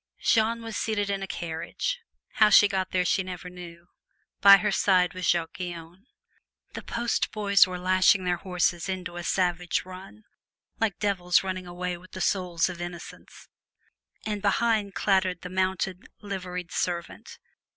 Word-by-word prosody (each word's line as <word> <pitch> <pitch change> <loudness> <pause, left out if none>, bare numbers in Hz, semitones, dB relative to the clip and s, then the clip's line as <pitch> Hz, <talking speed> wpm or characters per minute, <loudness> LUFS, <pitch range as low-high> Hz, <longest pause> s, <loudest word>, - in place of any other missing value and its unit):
Jeanne 230 0 +2
was 225 -1 -6
seated 205 -2 -1
in 195 -1 -2
a 195 - -4
carriage 175 - -4 0.4
how 215 -1 +7
she 205 - +7
got 190 -2 -2
there 180 -1 0
she 195 - +2
never 180 -1 -7
knew; 175 -1 -11 0.5
by 200 0 +10
her 210 +1 -1
side 185 -2 +3
sat 185 0 -7
Jacques 165 0 0
Guyon. 175 +3 -8 0.7
The - - -6
post 235 0 -1
boys 200 -3 +4
were 180 0 -5
lashing 185 +1 +3
their 180 -1 0
horses 180 -1 -1
into 185 -2 -4
a 175 - -5
savage 175 -1 0
run, 185 +4 -11 0.6
like 220 -5 0
devils 180 -4 +1
running 185 -1 -4
away 180 0 -4
with 185 +1 -18
the 185 - -6
souls 180 -4 +1
of 180 -2 -7
innocents, 175 -1 -9 0.8
and 210 -2 -3
behind 210 -1 +1
clattered 190 -3 +1
the 180 - -7
mounted, 190 0 -2
liveried 180 -3 -6
servant. 170 -1 -4
185 Hz, 155 wpm, -26 LUFS, 180-200 Hz, 0.8 s, by